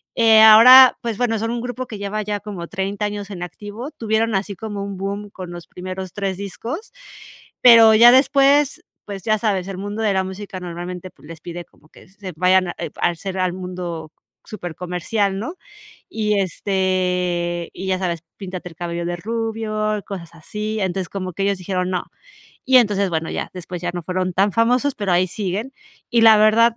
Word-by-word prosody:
Eh, 225 Hz, -1 st, +6 dB
ahora, 245 Hz, +4 st, +9 dB
pues, 230 Hz, -3 st, -3 dB
bueno, 225 Hz, -2 st, +1 dB
son 225 Hz, +1 st, -2 dB
un 240 Hz, -1 st, -3 dB
grupo 245 Hz, +1 st, -5 dB
que 215 Hz, -, -7 dB
lleva 205 Hz, +1 st, -3 dB
ya 205 Hz, 0 st, -3 dB
como 190 Hz, -5 st, -7 dB
30 195 Hz, +1 st, -3 dB
años 205 Hz, -1 st, -5 dB
en 180 Hz, -2 st, -6 dB
activo, 210 Hz, -, -8 dB
tuvieron 225 Hz, -2 st, -1 dB
así 195 Hz, +1 st, -2 dB
como 205 Hz, 0 st, -6 dB
un 200 Hz, -1 st, -6 dB
boom 200 Hz, +2 st, -4 dB
con 180 Hz, -2 st, -8 dB
los 175 Hz, -1 st, -9 dB
primeros 185 Hz, 0 st, -7 dB
3 195 Hz, -2 st, -3 dB
discos, 235 Hz, -, -6 dB, 0.7 s
pero 230 Hz, -2 st, +8 dB
ya 240 Hz, +2 st, +8 dB
después, 275 Hz, +2 st, +3 dB, 0.2 s
pues, 195 Hz, -3 st, -7 dB
ya 215 Hz, -1 st, +2 dB
sabes, 195 Hz, -5 st, -1 dB
el 195 Hz, -2 st, -6 dB
mundo 205 Hz, +3 st, -5 dB
de 210 Hz, -, +2 dB
la 190 Hz, 0 st, +1 dB
música 190 Hz, 0 st, -7 dB
normalmente, 180 Hz, +1 st, -7 dB
pues, 150 Hz, -, -19 dB
les 165 Hz, -1 st, -10 dB
pide 175 Hz, 0 st, -7 dB
como 155 Hz, -, -26 dB
que -, -, -18 dB
se 190 Hz, -2 st, -9 dB
vayan 185 Hz, +1 st, +3 dB
a, -, -, -6 dB
eh, -, -, -4 dB
al 175 Hz, -1 st, +2 dB
ser 190 Hz, 0 st, -6 dB
al 180 Hz, -1 st, 0 dB
mundo 180 Hz, -3 st, -6 dB, 0.3 s
supercomercial, 180 Hz, +2 st, -3 dB
¿no? 290 Hz, -, -5 dB, 0.5 s
Y 210 Hz, -2 st, 0 dB
este, 180 Hz, -2 st, -1 dB
y 190 Hz, -, -7 dB
ya 185 Hz, -1 st, +1 dB
sabes, 170 Hz, -3 st, -3 dB
píntate 185 Hz, -2 st, -7 dB
el 165 Hz, -, -16 dB
cabello 170 Hz, -1 st, -4 dB
de 175 Hz, 0 st, -2 dB
rubio, 215 Hz, 0 st, -2 dB
cosas 170 Hz, -4 st, -8 dB
así. 210 Hz, +6 st, -5 dB
Entonces, 190 Hz, -1 st, -2 dB
como 185 Hz, -3 st, -5 dB
que 195 Hz, -, -3 dB
ellos 200 Hz, -1 st, +1 dB
dijeron, 180 Hz, 0 st, -2 dB
no. 180 Hz, -, -2 dB, 0.6 s
Y 260 Hz, 0 st, +4 dB
entonces, 200 Hz, -5 st, +1 dB
bueno, 160 Hz, 0 st, -2 dB
ya, -, -, -4 dB
después 180 Hz, 0 st, -7 dB
ya 175 Hz, -, -1 dB
no 175 Hz, -, -4 dB
fueron 185 Hz, +1 st, -2 dB
tan 195 Hz, +1 st, +2 dB
famosos, 250 Hz, +4 st, +2 dB
pero 200 Hz, -4 st, -2 dB
ahí 180 Hz, +1 st, +3 dB
siguen. 210 Hz, +6 st, -4 dB, 0.4 s
Y 235 Hz, -2 st, +3 dB
la 220 Hz, -1 st, +8 dB
verdad, 230 Hz, +2 st, +4 dB
195 Hz, 195 wpm, -20 LUFS, 180-220 Hz, 0.7 s, ahora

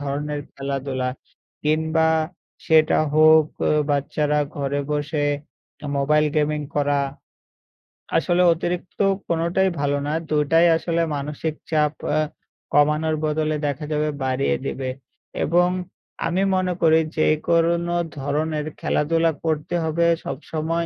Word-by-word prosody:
ধরনের 145 Hz, +1 st, -3 dB
খেলাধুলা 135 Hz, -2 st, -3 dB, 0.6 s
কিংবা 160 Hz, +1 st, +2 dB, 0.6 s
সেটা 155 Hz, -1 st, +4 dB, 0.2 s
হোক 155 Hz, 0 st, +6 dB, 0.2 s
অ -, -, +2 dB, 0.2 s
বাচ্চারা 150 Hz, +1 st, +1 dB, 0.2 s
ঘরে 140 Hz, 0 st, -1 dB
বসে 145 Hz, 0 st, -1 dB, 0.7 s
'মোবাইল 150 Hz, +2 st, +3 dB
গেমিং' 150 Hz, 0 st, +1 dB
করা 145 Hz, -1 st, +1 dB, 1.2 s
আসলে 175 Hz, +2 st, +2 dB
অতিরিক্ত 175 Hz, +1 st, -4 dB, 0.3 s
কোনটাই 170 Hz, +3 st, +1 dB
ভালো 145 Hz, 0 st, +1 dB
না। 150 Hz, -, -1 dB, 0.2 s
২ 150 Hz, -1 st, +2 dB
টাই 165 Hz, +1 st, +6 dB
আসলে 170 Hz, 0 st, -1 dB
মানসিক 150 Hz, +2 st, -3 dB, 0.2 s
চাপ 150 Hz, -1 st, +2 dB, 0.2 s
আ -, -, +3 dB, 0.5 s
কমানোর 150 Hz, +2 st, +3 dB
বদলে 155 Hz, 0 st, 0 dB
দেখা 145 Hz, +1 st, -2 dB
যাবে 150 Hz, 0 st, 0 dB
বাড়িয়ে 130 Hz, +1 st, 0 dB
দিবে। 130 Hz, -1 st, -3 dB, 0.6 s
এবং 175 Hz, +2 st, +3 dB, 0.6 s
আমি 175 Hz, +3 st, 0 dB
মনে 185 Hz, -1 st, 0 dB
করি 160 Hz, -1 st, +5 dB, 0.2 s
যে 155 Hz, -, +3 dB, 0.2 s
কোন 170 Hz, +1 st, +2 dB, 0.2 s
ধরনের 150 Hz, +2 st, -1 dB
খেলাধুলা 165 Hz, +2 st, +1 dB
করতে 155 Hz, +1 st, -1 dB
হবে। 160 Hz, +1 st, +1 dB, 0.2 s
সবসময় 160 Hz, +4 st, -3 dB
155 Hz, 115 wpm, -22 LUFS, 145-165 Hz, 1.2 s, হোক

